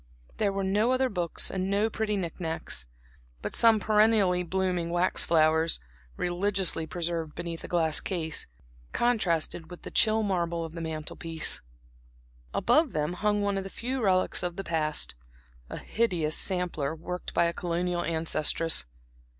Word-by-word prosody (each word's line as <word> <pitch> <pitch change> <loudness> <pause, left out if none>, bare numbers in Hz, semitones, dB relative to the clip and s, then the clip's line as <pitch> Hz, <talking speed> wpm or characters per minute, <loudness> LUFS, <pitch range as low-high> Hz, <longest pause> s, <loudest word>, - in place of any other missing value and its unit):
There 205 -2 +1
were 195 0 -2
no 210 +5 +2
other 255 0 +2
books 175 -5 -1
and 190 0 -2
no 200 +2 +2
pretty 215 -1 -1
knick 175 -3 -4
knacks; 160 - -3 0.6
but - - -3
some 225 -2 +5
perennially 210 -4 +3
blooming 180 -1 -1
wax 175 +2 +2
flowers, 160 0 +3 0.4
religiously 180 -2 +1
preserved 165 -3 -3
beneath 170 -1 -5
a - - -6
glass 160 -3 +2
case, 160 -5 -2 0.5
contrasted 175 -8 0
with 175 - -11
the - - -7
chill 220 0 +3
marble 170 -4 -1
of 160 - -9
the 165 - -6
mantel 155 -1 -5
piece. 165 -2 0 0.9
Above 290 - +2
them 150 +2 -1
hung 205 +2 0
one 200 -1 0
of - - -5
the 195 - -7
few 255 +5 -3
relics 185 -3 +3
of 175 -1 -2
the 195 - -4
past 155 -4 0 0.6
a - - -5
hideous 175 -9 0
sampler 175 -6 0
worked 180 +3 -6
by 170 - +4
a 170 - 0
colonial 175 0 -1
ancestress. 165 - +1
180 Hz, 155 wpm, -28 LUFS, 165-200 Hz, 0.9 s, some